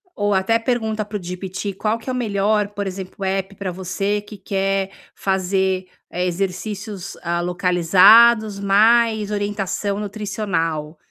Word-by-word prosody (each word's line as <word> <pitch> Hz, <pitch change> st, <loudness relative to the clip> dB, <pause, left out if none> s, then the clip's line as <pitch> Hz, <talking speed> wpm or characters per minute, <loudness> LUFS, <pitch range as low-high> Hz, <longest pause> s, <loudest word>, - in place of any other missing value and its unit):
ou 205 Hz, 0 st, 0 dB
até 195 Hz, +4 st, +2 dB
pergunta 225 Hz, -3 st, -1 dB
para 210 Hz, 0 st, -5 dB
o 195 Hz, -, -10 dB
GPT 185 Hz, +2 st, -5 dB
qual 215 Hz, +3 st, -1 dB
que 230 Hz, -, -17 dB
é -, -, -1 dB
o -, -, -3 dB
melhor, 210 Hz, -3 st, +1 dB
por 205 Hz, -1 st, -4 dB
exemplo, 190 Hz, +1 st, -7 dB
app 195 Hz, +1 st, -2 dB
pra 190 Hz, -1 st, -4 dB
você 195 Hz, +3 st, -2 dB
que 210 Hz, 0 st, -12 dB
quer 195 Hz, 0 st, -1 dB, 0.2 s
fazer, 190 Hz, -1 st, 0 dB, 0.2 s
eh, 180 Hz, +1 st, -1 dB
exercícios, 195 Hz, +2 st, -4 dB
hã, 170 Hz, 0 st, 0 dB
localizados 195 Hz, +5 st, +5 dB
mais 215 Hz, +1 st, +3 dB
orientação 205 Hz, -1 st, -2 dB
nutricional. 190 Hz, -7 st, -3 dB
195 Hz, 140 wpm, -21 LUFS, 185-210 Hz, 0.2 s, localizados